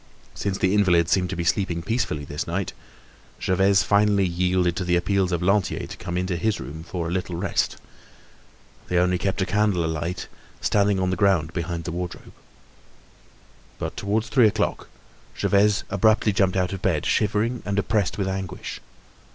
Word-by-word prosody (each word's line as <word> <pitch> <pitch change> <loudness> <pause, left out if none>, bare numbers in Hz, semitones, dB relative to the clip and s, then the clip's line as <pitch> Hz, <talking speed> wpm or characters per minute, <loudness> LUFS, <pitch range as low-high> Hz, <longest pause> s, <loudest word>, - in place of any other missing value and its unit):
Since 100 -1 -2
the 95 0 +1
invalid 90 -5 +3
seemed 90 -1 +2
to 95 - -3
be 85 - -2
sleeping 85 -1 0
peacefully 110 -9 -1
this 75 +3 -4
night, 90 +3 -2 0.7
Gervaise 95 +1 +3
finally 100 -1 +3
yielded 90 0 +1
to 95 - -1
the 90 0 +1
appeals 95 +1 +1
of 85 0 -1
Lantier 95 +1 +1
to - - -8
come 90 -1 -5
into 90 -1 -1
his 105 +5 0
room 80 +2 -7
for 85 0 -4
a - - -3
little 90 -1 -2
rest. 90 +2 -1 1.1
They 90 - 0
only 90 0 +2
kept 95 0 0
a - - -1
candle 100 -3 +1
alight, 80 +3 -3 0.3
standing 100 -1 +2
on 95 0 0
the - - 0
ground 85 -4 +2
behind 85 -1 -3
the 85 - -4
wardrobe. 90 +1 -6 1.4
But - - -4
towards 110 +3 -1
three 120 -2 +5
o'clock 105 - -1 0.5
Gervaise 105 +1 +3
abruptly 110 +2 +3
jumped 95 -1 +2
out 90 0 0
of 95 - -5
bed, 85 -6 0
shivering 110 +4 +1
and 100 0 -2
oppressed 100 -1 0
with 100 -2 -1
anguish. 95 -2 -5
95 Hz, 170 wpm, -24 LUFS, 90-100 Hz, 1.4 s, three